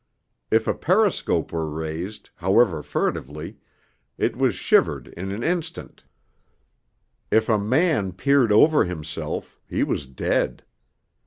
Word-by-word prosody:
If 110 0 +2
a - - +2
periscope 185 - +1
were 80 -1 -2
raised, 80 +6 -6
however 95 -2 +3
furtively, 75 +2 -3 0.6
it - - 0
was - - +1
shivered - - +2
in 95 +3 -6
an 105 +4 -4
instant; 170 -1 -3 1.2
if 110 0 +3
a 110 -2 +3
man 125 - +1
peered 130 +3 +3
over 150 +9 +6
himself, 80 -4 -5
he - - 0
was 70 - -2
dead. 65 - -1
100 Hz, 115 wpm, -23 LUFS, -, 1.2 s, over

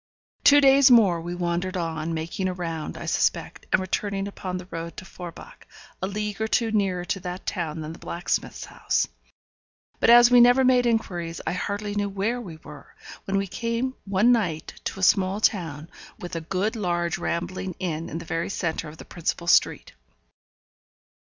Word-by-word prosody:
Two 290 0 +8
days 275 -1 +6
more 200 -9 +5
we 175 +1 -5
wandered 175 +2 -2
on, 165 -2 -3
making 165 +4 -3
a 185 - -3
round, 165 -3 -4
I - - -7
suspect, - - -1
and - - +4
returning 195 +1 -2
upon 185 -2 -5
the 180 - -8
road 165 0 -6
to 190 - -8
Forbach, 180 - -11 0.3
a 190 - -1
league 210 +1 -4
or 220 - +1
two 225 0 +1
nearer 190 -4 0
to 195 - -2
that 180 0 -6
town 160 -2 -3
than 155 +1 -6
the - - -13
blacksmith's 175 +1 -3
house. - - -1 0.9
But - - +3
as 240 +1 +8
we 245 -1 +8
never 245 +2 +6
made 250 -1 +4
inquiries 175 -7 -2
I - - -1
hardly 205 +3 -3
knew 205 0 -1
where 205 +5 -2
we 175 -8 -9
were, 150 - -13 0.3
when 195 0 0
we 195 - 0
came 230 +6 -2
one 200 +4 +3
night 180 -10 -1
to - - -4
a - - -4
small 190 +1 +3
town, 165 -8 0 0.3
with 175 0 -7
a 165 - -3
good 190 +7 -1
large 175 -5 -1
rambling 175 +1 -3
inn 165 -3 -3
in - - -5
the 170 - -7
very 165 +1 -2
centre 165 -4 -3
of 155 - -12
the - - -11
principal 170 0 -3
street. 170 - +2
185 Hz, 185 wpm, -25 LUFS, 170-210 Hz, 0.9 s, Two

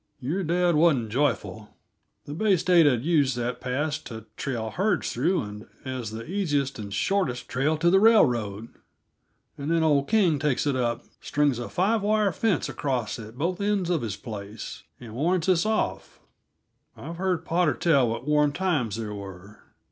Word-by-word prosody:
Your 165 +10 -2
dad 175 +1 +2
wasn't 150 -9 +3
joyful. 115 -5 -2 0.5
The 145 - -6
Bay 200 +3 +2
State 170 -2 +4
had 125 -2 +1
used 145 -6 +2
that 120 +1 -3
pass 145 +4 -1
to 115 -7 -9
trail 115 -5 -3
herds 195 +2 0
through 165 +7 +1
and 105 +1 -9 0.2
as 130 -4 -4
the 110 +1 -7
easiest 145 - -1
and 100 -2 -6
shortest 125 - -1
trail 145 +5 0
to 170 +2 +3
the 190 - +6
railroad; 120 - +3 0.9
and 140 +2 -4
then 165 -1 +2
old 145 -3 +2
King 185 -9 +3
takes 150 -2 0
it 140 -2 +1
up, 120 0 -1 0.2
strings 145 -4 +1
a 120 - -5
five 210 +5 +1
wired 210 -2 +2
fence 200 -5 0
across 125 -6 -2
at 110 +2 -10
both 175 +6 -2
ends 200 -3 0
of 170 - +1
his 110 -4 -3
place, 105 -1 -8 0.2
and 115 -3 -10
warns 165 +7 0
us 185 +1 +3
off. 95 - -2 0.8
I've 165 +4 -8
heard 180 -2 -1
Potter 170 -2 +1
tell 140 -8 +3
what 115 +4 -5
warm 150 -1 +3
times 155 - 0
there 110 -2 -5
were. 100 0 -10
145 Hz, 170 wpm, -26 LUFS, 120-175 Hz, 0.9 s, the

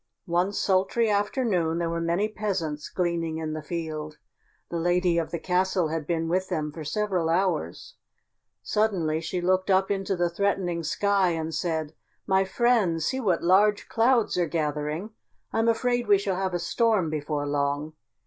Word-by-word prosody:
One 175 +3 +1
sultry 200 +3 +1
afternoon 205 - 0
there 170 -1 -1
were 170 0 -2
many 170 +5 +1
peasants 185 -9 -3
gleaning 170 -3 -1
in 160 -1 -3
the 155 - -4
field. 155 -1 -5 0.5
The 170 - -2
lady 175 0 +2
of 165 - -3
the 170 - -3
castle 180 0 +1
had 160 -1 -3
been 165 -1 -1
with 185 +3 0
them 150 -1 -2
for 155 +1 -8
several 180 +1 -1
hours. 170 - -1 0.7
Suddenly 175 -8 0
she 175 +2 -3
looked 185 +2 +1
up 190 +1 +3
into 195 -1 -1
the 175 -1 +1
threatening 175 -1 -1
sky 195 +3 +1
and 160 0 -3
said, 160 -1 -2 0.3
"My 190 0 +3
friends, 190 -6 +2
see 265 - -1
what 190 -9 +1
large 205 +4 +3
clouds 230 -4 +2
are 175 - +2
gathering. 150 +4 -2 0.4
I'm 225 +1 +1
afraid 245 +1 +1
we 205 - +6
shall 195 -1 -2
have 190 -1 -1
a - - +2
storm 205 -2 +1
before 150 -1 -2
long. 145 +1 -1
175 Hz, 165 wpm, -26 LUFS, 160-200 Hz, 0.7 s, we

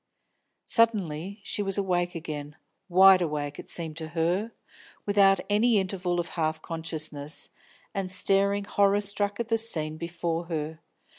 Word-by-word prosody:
Suddenly 200 -5 0
she 205 - -2
was 195 -1 0
awake 175 -3 0
again, 150 -3 -6 0.3
wide 190 +1 +7
awake, 150 -3 -3
it - - -9
seemed 160 -2 -1
to 160 -1 -4
her, 180 +7 0 0.5
without 195 -2 +4
any 215 +2 +3
interval 185 -2 -1
of 170 - -3
half 160 -1 -1
consciousness, 155 -2 -4 0.4
and 195 -3 -3
staring 200 +2 +2
horror 200 0 +2
struck 205 0 +1
at 235 -1 -3
the 225 -1 +4
scene 155 -9 0
before 170 0 -3
her. 160 -1 -4
180 Hz, 140 wpm, -27 LUFS, 160-200 Hz, 0.5 s, wide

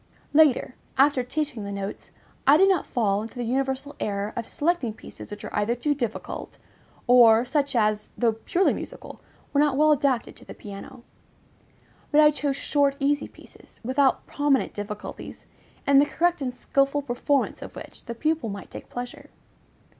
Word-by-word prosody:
Later, 290 -4 +4 0.2
after 275 -1 +4
teaching 255 -2 -3
the 200 - -5
notes, 200 0 -6 0.4
I 285 +2 +8
did 385 +3 +6
not 370 -6 +1
fall 205 -4 +1
into 225 +4 -8
the 245 - -3
universal 265 +3 -2
error 200 0 -2
of 230 - -4
selecting 290 -9 -1
pieces - - -11
which 205 0 -8
were - - -6
either 210 +3 +1
too 290 +5 0
difficult, 240 -6 -5 0.5
or 240 -2 +6
such 280 +1 0
as, 215 -2 +1
though 235 -2 +3
purely 345 - +1
musical, - - -8 0.3
were 285 - +3
not 290 -3 +2
well 305 +1 +5
adapted 270 -5 +1
to - - -16
the - - -10
piano; 210 +5 -10 1.1
but 300 - +5
I 300 0 +7
chose 285 -2 -2
short, 280 0 +1
easy 285 +1 +1
pieces, - - -17
without 260 +2 +2
prominent 290 -2 +1
difficulties, 210 0 -7 0.4
in 280 0 +6
the 290 - +4
correct 345 0 +1
and 255 -2 -1
skilful 275 +3 0
performance 270 +1 0
of - - -9
which - - -10
the 235 - -6
pupil 305 -2 -1
might 200 -1 -8
take - - -10
pleasure. 245 0 -7
265 Hz, 170 wpm, -25 LUFS, 225-290 Hz, 1.1 s, I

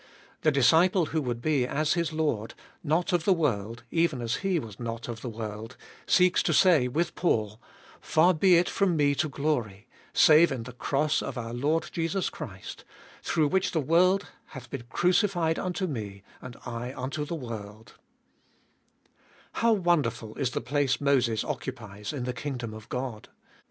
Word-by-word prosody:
The 155 - +4
disciple 165 +7 +4
who 160 - +1
would 120 -3 -4
be 145 -5 +1
as 150 +3 0
his 170 -2 -1
Lord, 150 -9 -2 0.2
" - - -35
not 175 +2 +1
of 175 -2 +2
the 195 - +4
world, 115 - -2
even 165 -5 +1
as 115 -1 -1
He 195 -2 0
was 110 -9 -6
not 115 -1 -5
of 115 -2 -6
the 125 - -5
world," 110 +1 -7 0.3
seeks 180 0 +4
to - - 0
say 165 -9 +5
with 165 +7 -1
Paul, 110 - -1 0.2
" - - -23
Far 175 +4 +4
be 180 +2 +4
it 175 - +2
from 185 -5 +1
me 145 -1 +3
to 150 +2 -1
glory, 125 -8 -2 0.3
save 160 +2 +6
in 125 -4 -3
the 125 - -8
cross 145 +4 0
of - - -5
our 115 -1 -5
Lord 150 +7 0
Jesus 165 +3 -1
Christ, 100 - -8 0.4
through 155 -2 +1
which 190 +2 0
tJie 160 -5 0
world 185 +5 +3 0.2
hath 130 -1 -11
been 130 -4 -6
crucified 175 -2 +1
unto 185 +1 -2
me, 105 - -6 0.2
and 125 -2 -9
I 120 +2 -5
unto 135 +4 -3
the 160 +3 -4
world" 110 -6 -8 1.6
How 230 0 +2
wonderful 145 - 0
is 135 -4 -1
the - - -3
place 140 0 0
Moses 130 -6 +2
occupies 105 -6 -6
in 140 -5 -4
the 125 0 -3
kingdom 125 -3 -5
of 110 0 -11
God. 125 -4 -5
140 Hz, 175 wpm, -27 LUFS, 115-165 Hz, 1.6 s, save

